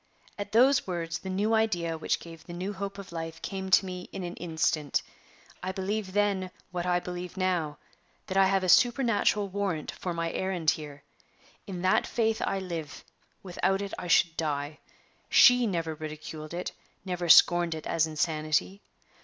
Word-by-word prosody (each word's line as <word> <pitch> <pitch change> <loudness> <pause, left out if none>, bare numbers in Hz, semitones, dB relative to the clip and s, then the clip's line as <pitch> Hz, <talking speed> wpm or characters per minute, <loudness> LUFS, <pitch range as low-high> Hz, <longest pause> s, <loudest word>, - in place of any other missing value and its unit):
At 205 0 -6
those 255 +3 +4
words, 170 -2 -3
the 190 - -7
new 205 +4 0
idea 180 -7 +1
which 160 - -1
gave 165 -1 -11
the 175 - -10
new 185 +4 -4
hope 200 0 -5
of 200 -2 -9
life 165 -1 -5
came 190 -1 -4
to 190 +1 +5
me 180 -1 -7
in 190 - -5
an 175 0 -4
instant. 160 -3 0 0.6
I 185 - -3
believed 190 +1 -3
then, 200 -2 +1 0.2
what 180 0 -3
I 180 0 +2
believe 180 +1 -7
now, 175 -5 0 0.5
that 190 - -5
I 195 0 +5
have 195 0 +1
a - - 0
supernatural 230 -2 +3
warrant 190 -5 -2
for 180 - -5
my 170 -1 -2
errand 180 -5 +1
here. 145 -2 -7 0.6
In 185 -2 -5
that 185 - +3
faith 225 -1 0
I 195 - 0
live; 170 -6 -6 0.4
without 195 +1 0
it 200 -1 -5
I 180 - -6
should 170 -1 +4
die. 150 -1 -2 0.5
She 245 -1 +7
never 165 -5 -2
ridiculed 155 +1 -7
it, 180 - -3 0.3
never 180 -2 -3
scorned 175 +1 +6
it 155 - -8
as 160 -1 +1
insanity. 155 +4 -1
180 Hz, 170 wpm, -28 LUFS, 165-195 Hz, 0.6 s, She